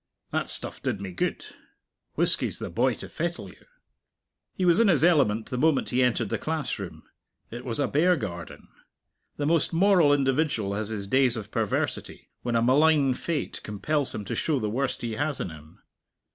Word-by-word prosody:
"That - - -1
stuff - - -2
did - - -2
me 100 -1 -6
good. 90 - -2 0.7
Whisky's - - +2
the - - -6
boy - - +1
to - - -8
fettle 170 +1 -4
you." - - -18 0.9
He 185 - 0
was 175 +2 +5
in 230 - +5
his 160 -8 +3
element 135 -11 +3
the 125 - -2
moment 155 -1 +2
he 125 +1 +1
entered 120 -3 +1
the - - -2
classroom. 155 -4 -4 0.5
It 120 +2 -7
was 120 0 -1
a 140 - +2
bear 175 +5 +3
garden. 90 - -7 0.7
The 145 - -1
most 165 +2 +2
moral 175 -4 +5
individual 135 -6 +1
has 105 +1 -3
his 105 -3 -4
days 130 +2 +3
of 105 -1 -7
perversity 110 -3 -2
when 120 -1 -2
a 115 - +3
malign 140 +1 +4
fate 155 +3 -3
compels 140 +7 -1
him 105 - -5
to - - -4
show 150 -4 0
the 105 -3 -2
worst 130 +2 -2
he 115 - -2
has 145 +5 -2
in 90 - -3
him. 80 0 -15
130 Hz, 185 wpm, -26 LUFS, 110-155 Hz, 0.9 s, was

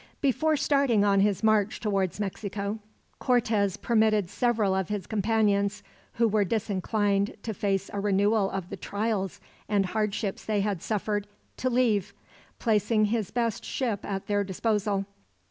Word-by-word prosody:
Before 305 +3 +2
starting 275 -8 +3
on 200 -1 +4
his 200 +1 +2
march 215 -1 +2
towards 195 -3 -1
Mexico, 200 +1 -3 0.4
Cortez 220 -6 +1
permitted 215 -5 +2
several 225 -6 +1
of 190 -2 -1
his 205 -2 -3
companions, 205 -1 +1 0.3
who 230 0 +2
were 215 -1 +2
disinclined 205 0 0
to 220 - -3
face 195 -2 -1
a 200 - -2
renewal 205 +1 +2
of 190 -2 -5
the - - -5
trials 205 -2 -2 0.3
and 200 -2 +2
hardships 210 0 -2
they 210 -2 0
had 200 -4 -1
suffered, 210 -1 -2 0.3
to 255 - 0
leave; 235 -6 +1 0.4
placing 215 -1 +2
his 215 -2 -1
best 230 -3 -1
ship 230 -7 -2
at 195 -1 -4
their 205 -1 +1
disposal. 200 0 -1
210 Hz, 145 wpm, -27 LUFS, 200-220 Hz, 0.4 s, on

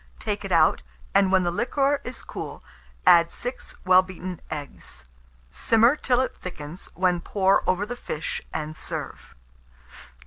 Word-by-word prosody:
Take - - -3
it - - -5
out, - - +4 0.3
and 195 -1 +4
when 190 -1 +4
the 175 - +1
liquor 275 +8 +1
is 250 - -6
cool, - - -7 0.4
add 170 -2 +7
6 245 +1 -5
well 185 0 +7
beaten 185 -1 -7
eggs; 145 - -5 0.5
simmer 230 +4 +4
till 255 -4 +2
it 260 - -2
thickens, 170 -1 -8
when 180 -1 +2
pour 195 +1 +2
over 185 +2 +1
the 245 +3 -5
fish, 160 -9 -4
and 155 0 -4
serve. - - -6
185 Hz, 145 wpm, -25 LUFS, 175-235 Hz, 0.5 s, add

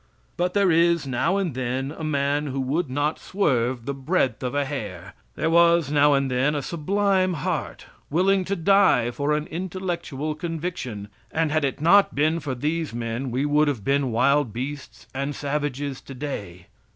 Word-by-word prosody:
But 180 +1 -1
there 200 -3 +4
is 170 -1 +3
now 135 +9 0
and 185 -7 -1
then 130 +2 -2
a 160 - -7
man 145 0 0
who 135 0 -3
would 140 +4 -1
not 145 +4 -1
swerve 130 - 0
the 140 - -2
breadth 135 -3 0
of 125 +2 -3
a 145 0 +1
hair. 100 -10 -6 0.2
There 160 - 0
was 170 -3 +4
now 145 0 +5
and 135 -1 0
then 135 +4 +1
a 145 - -2
sublime 185 +2 +1
heart 140 - -3 0.2
willing 190 +5 +2
to 200 - -1
die 170 -10 +4
for 145 +4 -1
an 150 0 -2
intellectual 170 -4 -4
conviction, 155 - -5 0.2
and 160 -1 0
had 155 0 +1
it 140 +1 -2
not 195 +5 +5
been 155 +4 +2
for 140 -4 -4
these 155 +1 -2
men 120 +2 -3
we 130 +4 -1
would 150 +1 +3
have 130 -8 -2
been 135 +1 +1
wild 140 +2 +2
beasts 135 +5 -6
and 140 +2 -3
savages 145 -1 -3
today. 125 -11 -7
145 Hz, 175 wpm, -24 LUFS, 130-165 Hz, 0.2 s, now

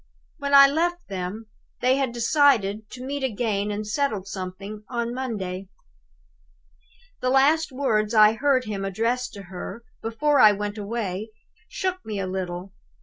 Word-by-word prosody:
When 280 0 +2
I 275 0 +11
left 345 +4 0
them, 195 +3 -5 0.3
they 255 +1 +3
had 270 -3 0
decided 230 -5 +2
to 255 0 -8
meet 280 +1 -3
again 210 -4 -1
and 210 +1 -3
settle 215 -3 -1
something 195 +2 -7
on 235 -1 -2
Monday. 195 -7 -4 1.5
"The 255 - 0
last 290 +4 +3
words 225 -5 0
I 215 0 +7
heard 260 +1 +2
him 205 -2 -4
address 230 +6 -1
to 200 - -10
her, 190 +5 -8 0.2
before 285 +6 +1
I 210 -1 +8
went 205 +1 -4
away, 205 -1 -3 0.4
shook 370 -1 -3
me 210 -2 -4
a 195 - -1
little. 185 0 -5
225 Hz, 145 wpm, -24 LUFS, 200-265 Hz, 1.5 s, I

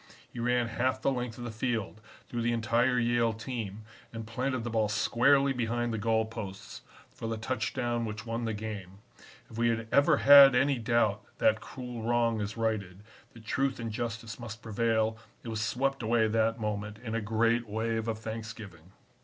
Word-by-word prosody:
He 120 - -6
ran 120 0 +1
half 125 +3 0
the 135 - +1
length 125 -3 -3
of 120 - -7
the 120 - -4
field, 110 -2 -3 0.3
through 120 - -3
the 120 +1 +1
entire 120 +2 +2
Yale 120 -1 +2
team, 110 -2 -5 0.3
and 115 -1 -6
planted 125 +2 -2
the 120 - -4
ball 110 -2 +1
squarely 135 +6 +3
behind 120 -1 -1
the 110 - -2
goal 110 +1 +2
posts 100 -3 -8 0.3
for 115 - -6
the 115 0 -2
touchdown 120 +1 -2
which 110 0 -5
won 115 0 -3
the 110 - -1
game. 105 -3 -6 0.5
If 115 - -7
we 120 - +3
had 115 0 -1
ever 145 +2 +5
had 140 -2 +9
any 135 0 +3
doubt 115 -3 +1 0.2
that 110 0 +3
cruel 125 -3 -7
wrong 115 -1 +1
is 105 +2 -4
righted, 105 -4 -2 0.3
that 115 -2 -14
truth 135 +3 0
and 115 -1 -4
justice 115 0 -5
must 115 -1 -8
prevail, 110 0 0 0.2
it 115 - -6
was 110 -1 -3
swept 130 +5 0
away 115 0 +2
that 115 +1 +1
moment 105 -1 -3
in 115 0 -6
a 115 - 0
great 115 +2 +1
wave 110 +1 -1
of 110 -1 -1
thanksgiving. 110 -6 -8
115 Hz, 185 wpm, -30 LUFS, 110-120 Hz, 0.5 s, had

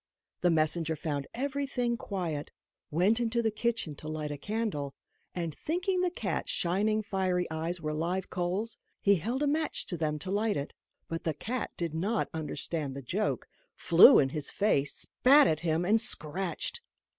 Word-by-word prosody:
The 180 - +4
messenger 160 0 +1
found 145 -2 -3
everything 265 -2 -1
quiet, 175 -10 -3 0.4
went 190 +9 +3
into 235 0 0
the 220 - +2
kitchen 225 -7 -1
to 155 - -9
light 155 -1 -3
a 145 - -4
candle, 205 -9 -2 0.4
and, 170 -3 -2
thinking 365 +3 -1
the 365 - +2
cat's 355 - -3
shining 210 +5 +1
fiery 185 -3 0
eyes 165 +3 -2
were 155 0 -2
live 175 +4 -1
coals, 185 +5 -2 0.2
he 200 -1 +4
held 240 - -2
a - - +2
match 305 +1 0
to 175 - -3
them 155 -1 -1
to 185 +5 -5
light 210 +1 +1
it. 140 +1 -4 0.3
But 165 0 -4
the 160 -3 -1
cat 235 - -3
did 170 -3 -2
not 200 +8 0
understand 155 -2 -2
the 140 - -6
joke, 200 - -1 0.3
flew 180 +10 +8
in 135 - +4
his 150 0 -4
face, 145 -9 +1
spat 280 +3 +5
at 155 - +2
him, 165 +1 0
and 215 +4 +4
scratched. 175 -5 -3
180 Hz, 170 wpm, -30 LUFS, 155-225 Hz, 0.4 s, flew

